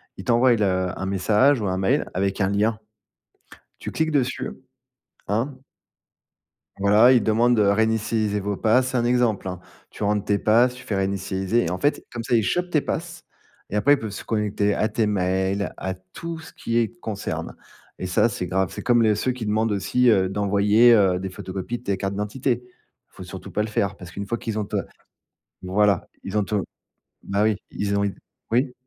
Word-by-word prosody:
Ils - - -9
t'envoient 120 +1 +4
le 95 -3 +1
un 95 - -4
message 105 +8 +3
ou 105 - -2
un 95 0 -1
mail 120 +10 +1
avec 95 +2 -1
un 95 - +2
lien, 105 +2 +1 1.0
tu - - -6
cliques 160 0 0
dessus, 130 -2 0 0.8
hein? 115 +7 -1 1.2
Voilà, 105 +5 +5
ils 120 -4 +4
demandent 120 +2 +3
de 105 - +4
réinitialiser 110 0 +1
vos 100 0 -2
pass, 125 +5 +3
c'est 130 - -2
un 120 - +1
exemple 120 -5 +1
hein. 90 -1 -5 0.3
Tu - - -10
rentres 105 0 +1
tes 100 -1 +2
pass, 120 +4 +3
tu 130 - -12
fais 105 - -3
réinitialiser 95 +2 0
et 85 - -2
en 90 - -2
fait 145 +7 0
comme 120 -2 -4
ça 120 0 +1
ils 110 - +3
chopent 180 - 0
tes 155 -4 +3
pass - - -5 0.5
et - - -5
après 145 +8 +5
ils - - -2
peuvent 110 -2 -5
se 100 - -7
connecter 105 -2 0
à 110 - +1
tes 115 -2 0
mails, 95 0 0
à 95 0 -3
tout 130 - -8
ce 160 +1 -12
qui 115 0 -2
est 115 0 -1
concerne 105 -2 -5 0.4
et 95 - -4
ça 90 +5 +3
c'est 95 -5 -4
grave. 95 0 0
C'est - - -6
comme 120 -2 +3
les 105 -2 +3
ceux 130 - 0
qui 125 -3 -6
demandent 110 +1 +1
aussi, 100 +6 +1
heu, 95 -4 +4
d'envoyer, 105 +4 +4
heu, 95 -4 +3
des 95 0 -5
photocopies 95 +4 -5
de - - -21
tes 100 -3 0
cartes 95 0 -3
d'identité. 120 +5 -2 0.5
Faut - - -11
surtout - - -9
pas 105 - 0
le 110 - -3
faire 100 -2 -1
parce 90 -2 -11
qu'une 100 +3 -5
fois 115 +3 -2
qu'ils 110 -2 -4
ont - - -1
ta - - -2 0.8
voilà 100 +1 +1 0.2
ils 95 +2 -3
ont 105 - +2
ton 105 -2 -1 0.6
bah 100 +1 0
oui, 110 -1 +3 0.2
ils 100 0 -2
ont 100 - +1
une 100 -1 -2 0.4
oui? 125 +2 +1
105 Hz, 205 wpm, -23 LUFS, 95-120 Hz, 1.2 s, Voilà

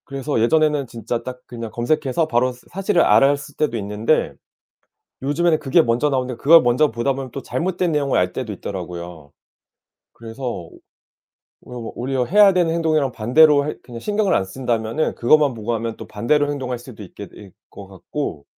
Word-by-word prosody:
그래서 135 -1 -3
예전에는 150 +2 +2
진짜 115 +1 -5
딱 125 0 -7
그냥 115 -2 -7
검색해서 150 +6 0
바로 125 -1 +1
사 125 0 -17 0.2
사실을 195 -3 +3
알았을 140 +1 +3
때도 145 -6 -1
있는데 105 +7 0 0.9
요즘에는 155 +4 +1
그게 150 +3 +3
먼저 120 +3 +1
나오는데 130 -2 -2
그걸 165 +4 +7
먼저 125 +4 +2
보다 120 +4 -1
보면 130 -1 -7
또 135 - -6
잘못된 180 +2 -2
내용을 145 -3 0
알 90 0 0
때도 120 -5 -4
있더라고요. 85 -6 -7 0.8
그래서 115 +3 -11
오 105 -10 -5 0.8
오 125 -1 -9
뭐 115 - -6
오히려 130 +1 -1
해야 205 - +6
되는 175 -3 +1
행동이랑 155 -5 +1
반대로 140 +7 +4
할 150 - -5
그냥 120 -2 -10
신경을 205 - 0
안 95 - +1
쓴다면은 115 +5 -2
그것만 145 +2 +3
보고 115 +1 -4
하면 115 0 -4
또 - - -10
반대로 145 +7 0
행동할 130 -4 -4
수도 120 -3 -12
있게 100 0 -10
될 105 - -14
것 100 +2 -15
같고 95 - -6
130 Hz, 380 characters per minute, -20 LUFS, 115-150 Hz, 0.9 s, 그걸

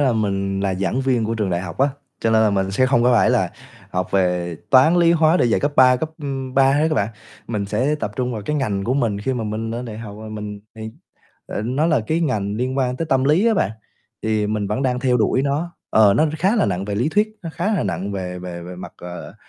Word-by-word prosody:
là 135 -4 +3
mình 100 -3 -1
là 95 -1 0
giảng 100 +7 -1
viên 130 -4 +1
của 115 +1 -1
trường 105 -4 -1
đại 85 0 0
học 95 +2 -7
á, 140 +2 +4 0.3
cho 115 - +1
nên 110 0 +4
là 110 - +3
mình 95 -1 0
sẽ 130 +7 +2
không 125 -2 +3
có 125 - +4
phải 120 - +4
là - - +1 0.4
học 90 0 -2
về 90 -3 0
toán, 140 +6 +6
lý, 170 -1 +5
hóa 160 0 +4
để - - +3
dạy 115 - +2
cấp 145 +1 0
ba 125 -1 +6
cấp, 155 +4 -3
ưm, 135 -2 -4
3 135 0 +5
hết 145 - +2
á 155 - 0
bạn, 100 -4 +1 0.4
mình 105 -3 -2
sẽ 125 +9 0
tập 150 - -3
trung 125 -1 -1
vào 110 -3 -5
cái 150 +9 -2
ngành 105 -8 -1
của 125 +5 0
mình 110 -7 0
khi 130 +6 -1
mà 120 -3 -3
mình 110 +1 -3
lên 120 +2 -4
đại 110 -3 -7
học 105 -3 -8
rồi 110 0 -8
mình 105 -1 -6 0.2
thì 110 0 -6 0.6
ờ, - - -4
nó 130 +8 0
là 155 -7 +2
cái 160 +6 0
ngành 105 -10 -1
liên 130 +3 -2
quan 125 -1 0
tới 165 - -3
tâm 135 -2 +2
lý 160 +10 +3
á 230 - +4
bạn. 105 - +1 0.5
Thì 110 -1 0
mình 105 -1 -1
vẫn 105 +6 -2
đang 125 -2 0
theo 125 -2 +2
đuổi 125 +3 +2
nó 150 +5 -2 0.2
ờ, 105 -2 +5
nó 155 - +4
khá 195 +7 +2
là - - +3
nặng 95 0 -2
về 100 0 -3
lý 120 +8 +1
thuyết, 210 +6 +2
nó 165 - -5
khá 185 +7 -1
là 180 - 0
nặng 95 +1 -3
về 90 -2 -4
về 90 -1 -7
về 90 +1 -8
mặt, 90 - -9
ờ, 90 0 -9
115 Hz, 270 wpm, -21 LUFS, 100-135 Hz, 0.6 s, toán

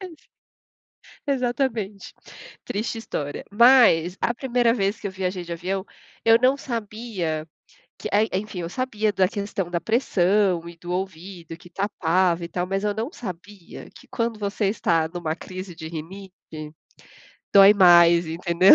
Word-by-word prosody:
Exa 360 -5 -11 1.0
exatamente, 245 -6 -2 0.5
triste 225 +2 -3
história. 145 -9 -5
Mas, 210 -7 +5
a 240 - 0
primeira 245 -2 +1
vez 200 -2 -1
que 205 - -6
eu - - -3
viajei 185 -1 -3
de 170 - -7
avião, 190 +3 -3 0.4
eu 225 0 +6
não 260 +2 +4
sabia 215 - -4 0.5
que - - -5
é 210 +1 +4
en - - -1 0.2
enfim, 200 -4 -8
eu 165 - -5
sabia 220 -3 -1
da 190 -1 +3
questão 200 -3 -4
da 170 - 0
pressão 195 -6 +1
e 170 - -10
do 175 +1 -8
ouvido 180 -2 -5
que 175 - -16
tapava 180 -2 0
e - - -4
tal, 180 0 -2
mas 195 +1 -2
eu 205 -1 0
não 225 +6 -3
sabia 190 - -9
que - - -15
quando 230 -2 -2
você 205 +1 -2
está 165 -6 +1
numa 165 -2 -4
crise 185 0 -8
de 160 -1 -8
rinite 160 -2 -9 0.8
dói 200 +1 +9
mais, 175 -3 +6
entendeu? 170 +3 +4
195 Hz, 155 wpm, -23 LUFS, 175-220 Hz, 1.0 s, dói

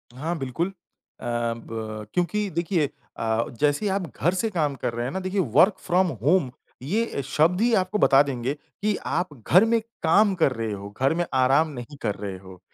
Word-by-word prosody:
हाँ 160 +6 -3
बिल्कुल। 135 +6 -2
अ, 195 - -14 0.5
ब 115 -2 -3
क्योंकि 200 +3 0
देखिए 170 -3 +1 0.3
अ, 110 0 +1 0.2
जैसे 150 +7 +2
ही - - +2
आप 195 +1 0 0.2
घर 175 - +2
से 215 +4 0
काम 155 -7 0
कर 120 -2 -3
रहे 120 +1 -2
हैं 130 - -3
ना, 190 - -2
देखिए 185 +1 -2
वर्क 185 - +5
फ्रॉम 185 +1 +3 0.2
होम 150 -3 +3 0.3
ये 205 - -1
शब्द 160 +7 +2
ही 235 0 +3
आपको 185 +1 +1
बता 135 -1 +6
देंगे 130 -1 -2
कि 205 +8 -4
आप 180 - -1 0.2
घर 185 +5 +7
में 230 0 +3 0.2
काम 200 +5 +4
कर 140 - +5
रहे 115 -3 -3
हो, 100 0 -6
घर 135 +3 +3
में 175 +1 0
आराम 135 +4 +4
नहीं 120 +4 -8
कर 105 -3 -1
रहे 100 -2 -5
हो। 95 -1 -13
150 Hz, 200 wpm, -25 LUFS, 120-185 Hz, 0.5 s, घर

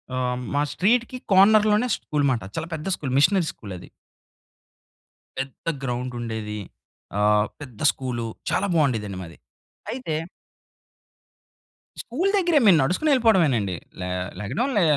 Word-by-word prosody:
ఆహ్, 125 -1 -1
మా 145 - +2
స్ట్రీట్‌కి 235 +9 +1
కార్నర్‌లోనే 210 +3 +5
స్కూల్ 150 -1 -2
మాట. 120 -3 -1
చాలా 165 - -3
పెద్ద 155 +2 -5
స్కూల్, 135 -4 -5
మిషనరీ 175 +3 +4
స్కూలది. 95 -5 -9 1.5
పెద్ద 135 -1 -6 0.2
గ్రౌండుండేది. 120 -4 -4 0.6
ఆహ్, 105 0 +4
పెద్ద 125 -7 -11
స్కూలు 125 -3 -4 0.3
చాలా - - +1
బావుండేదండి 110 - 0
మాది. 85 - -12 0.5
అయితే 240 -11 -3 1.8
స్కూల్ 335 +12 -1
దెగ్గరే, 345 -5 +3
‌మేం 190 -4 +8
నడుసుకునెళ్ళిపోవడమేనండి. 180 - +3 0.3
లె 90 - -3 0.3
లెగడం 215 - -1
లె 205 - +4
145 Hz, 110 wpm, -24 LUFS, -, 1.8 s, ‌మేం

